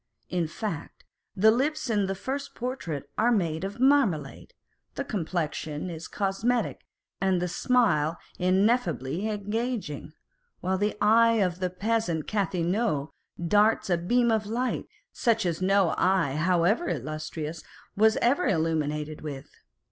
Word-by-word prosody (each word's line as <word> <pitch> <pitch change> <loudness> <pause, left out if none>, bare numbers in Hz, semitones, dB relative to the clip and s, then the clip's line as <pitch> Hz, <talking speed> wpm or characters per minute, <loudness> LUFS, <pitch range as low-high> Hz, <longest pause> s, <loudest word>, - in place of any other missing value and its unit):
In 175 -2 0
fact, 170 -1 -6 0.3
the 215 +3 +6
lips 290 +6 0
in 205 -4 +1
the 195 - -2
first 275 +8 -5
portrait 175 - -4
are 235 +2 +4
made 170 -7 0
of 200 +4 -5
marmalade, 255 - +1 0.4
the - - -2
complexion 160 -3 -3
is 160 0 -7
cos 195 0 -2
metic, 245 0 +1 0.4
and 190 -2 +2
the 180 - -1
smile 175 - +2 0.2
ineffably 185 - +1
engaging; 210 - -3 0.5
while 185 +1 -1
the 210 +1 0
eye 230 +2 +5
of 185 -5 +1
the 185 -1 0
peasant 185 -4 -1
Cathelineau 185 -4 0 0.4
darts 210 +1 +3
a 175 - +4
beam 235 +7 +2
of 215 -2 0
light, 245 +4 -2 0.3
such 225 -4 +1
as 170 0 -1
no 195 -2 +3
eye, 185 -6 +3
however 180 - +2
illustrious, 155 +1 -4 0.3
was 220 +2 +4
ever 255 +7 +3
illumined 155 -4 -1
with. 140 -3 -7
190 Hz, 135 wpm, -27 LUFS, 165-225 Hz, 0.5 s, the